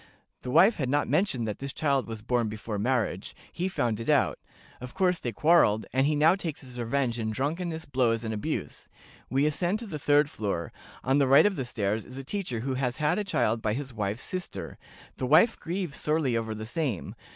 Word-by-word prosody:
The 125 Hz, -, -7 dB
wife 195 Hz, -, +5 dB
had 130 Hz, -4 st, -1 dB
not 145 Hz, +2 st, +1 dB
mentioned 130 Hz, -, +1 dB
that 105 Hz, -, -4 dB
this 140 Hz, 0 st, -5 dB
child 140 Hz, -4 st, 0 dB
was 110 Hz, -2 st, -7 dB
born 120 Hz, -1 st, 0 dB
before 105 Hz, 0 st, -5 dB
marriage; 115 Hz, -4 st, -1 dB, 0.2 s
he 180 Hz, +2 st, -2 dB
found 120 Hz, -, -1 dB
it 115 Hz, -, -4 dB
out; -, -, +3 dB, 0.4 s
of 125 Hz, -1 st, -8 dB
course 180 Hz, -2 st, +2 dB
they 120 Hz, -, -3 dB
quarreled, 115 Hz, -5 st, +4 dB
and 135 Hz, +2 st, +3 dB
he 150 Hz, -, +1 dB
now 155 Hz, +3 st, +5 dB
takes 170 Hz, -6 st, -4 dB
his 125 Hz, -2 st, -10 dB
revenge 120 Hz, 0 st, -1 dB
in 110 Hz, -1 st, -1 dB
drunkenness, 160 Hz, +7 st, -2 dB
blows, 120 Hz, -4 st, +1 dB
and 110 Hz, -1 st, -3 dB
abuse. 105 Hz, -, -4 dB, 0.4 s
We 135 Hz, +3 st, +2 dB
ascend 175 Hz, +6 st, 0 dB
to 230 Hz, -, -7 dB
the 155 Hz, -8 st, -6 dB
third 145 Hz, +1 st, +4 dB
floor. 100 Hz, -, -3 dB, 0.3 s
On 135 Hz, +2 st, +2 dB
the 140 Hz, -, +3 dB
right 135 Hz, +7 st, +7 dB
of 205 Hz, -2 st, +2 dB
the 130 Hz, -, -3 dB
stairs 110 Hz, -2 st, -1 dB
is 130 Hz, -, -11 dB
a 135 Hz, -, -5 dB
teacher 135 Hz, -, -3 dB
who 135 Hz, +2 st, -2 dB
has 130 Hz, -1 st, -1 dB
had 150 Hz, +7 st, +1 dB
a -, -, 0 dB
child 115 Hz, -, 0 dB
by 110 Hz, -1 st, 0 dB
his 130 Hz, +1 st, -5 dB
wife's 105 Hz, +2 st, -3 dB
sister; 185 Hz, -1 st, -6 dB, 0.4 s
the 130 Hz, -, -2 dB
wife 170 Hz, -, +5 dB
grieves 175 Hz, -3 st, -3 dB
sorely 150 Hz, -5 st, +1 dB
over 110 Hz, -1 st, -2 dB
the 110 Hz, 0 st, -6 dB
same. 120 Hz, -, -3 dB
130 Hz, 215 wpm, -28 LUFS, 115-155 Hz, 0.4 s, right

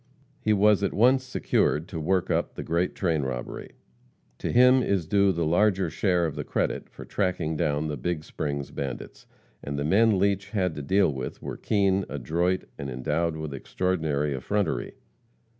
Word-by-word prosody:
He 110 Hz, -, 0 dB
was 105 Hz, 0 st, +4 dB
at 100 Hz, -, -1 dB
once 130 Hz, +5 st, +4 dB
secured 85 Hz, -10 st, 0 dB
to 80 Hz, -, -4 dB
work 90 Hz, +3 st, 0 dB
up -, -, 0 dB
the -, -, -5 dB
great 85 Hz, +2 st, 0 dB
train 80 Hz, -5 st, 0 dB
robbery. 65 Hz, -2 st, -5 dB, 0.7 s
To -, -, -2 dB
him 125 Hz, +1 st, +6 dB
is 100 Hz, -8 st, 0 dB
due 100 Hz, +3 st, +3 dB
the 85 Hz, -2 st, -1 dB
larger 95 Hz, +1 st, +2 dB
share 90 Hz, 0 st, +1 dB
of 80 Hz, -, -2 dB
the -, -, -4 dB
credit -, -, -2 dB
for -, -, -11 dB
tracking 90 Hz, -5 st, -1 dB
down 75 Hz, 0 st, 0 dB
the 75 Hz, -1 st, -3 dB
Big 80 Hz, +4 st, -2 dB
Springs 70 Hz, -2 st, -4 dB
bandits. 70 Hz, -3 st, -6 dB, 0.4 s
And 70 Hz, 0 st, -4 dB
the 70 Hz, -, -1 dB
men 105 Hz, +5 st, +4 dB
Leach 100 Hz, +1 st, +1 dB
had 95 Hz, -6 st, 0 dB
to 75 Hz, -, -6 dB
deal 95 Hz, +2 st, +2 dB
with 65 Hz, -1 st, -6 dB
were -, -, -4 dB
keen, 100 Hz, -2 st, +1 dB
adroit, 85 Hz, +7 st, 0 dB, 0.2 s
and 70 Hz, -, -4 dB
endowed 80 Hz, +6 st, -1 dB
with 80 Hz, -2 st, -5 dB
extraordinary 75 Hz, -1 st, -1 dB
effrontery. 95 Hz, +7 st, -2 dB
85 Hz, 175 wpm, -26 LUFS, 75-100 Hz, 0.7 s, him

